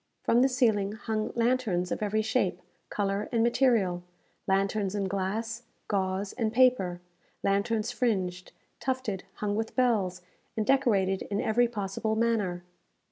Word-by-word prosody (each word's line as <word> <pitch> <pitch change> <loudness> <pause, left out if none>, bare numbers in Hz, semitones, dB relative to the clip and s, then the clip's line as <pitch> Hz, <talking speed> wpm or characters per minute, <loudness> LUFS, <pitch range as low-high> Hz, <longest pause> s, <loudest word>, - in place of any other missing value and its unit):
From 235 - +4
the 265 - +4
ceiling 220 -6 +2
hung 215 0 -3
lanterns 230 -7 +1
of - - -2
every 215 +1 +1
shape, 205 -5 0 0.3
colour, 200 0 -1
and 230 -1 +2
material 230 -8 +2 0.5
lanterns 195 +1 +1
in 200 -2 0
glass, 210 +4 -2 0.3
gauze, 195 0 -1
and 225 -3 -1
paper 235 -8 +3 0.4
lanterns 210 +2 +1
fringed, 185 -7 -1 0.3
tufted, 255 -8 -2
hung 205 -1 -2
with 225 +1 -3
bells, 200 -8 +1 0.3
and 215 - +1
decorated 205 -8 +2
in 205 0 -1
every 240 +3 +3
possible 215 0 -2
manner. 215 -6 0
210 Hz, 135 wpm, -28 LUFS, 195-235 Hz, 0.5 s, From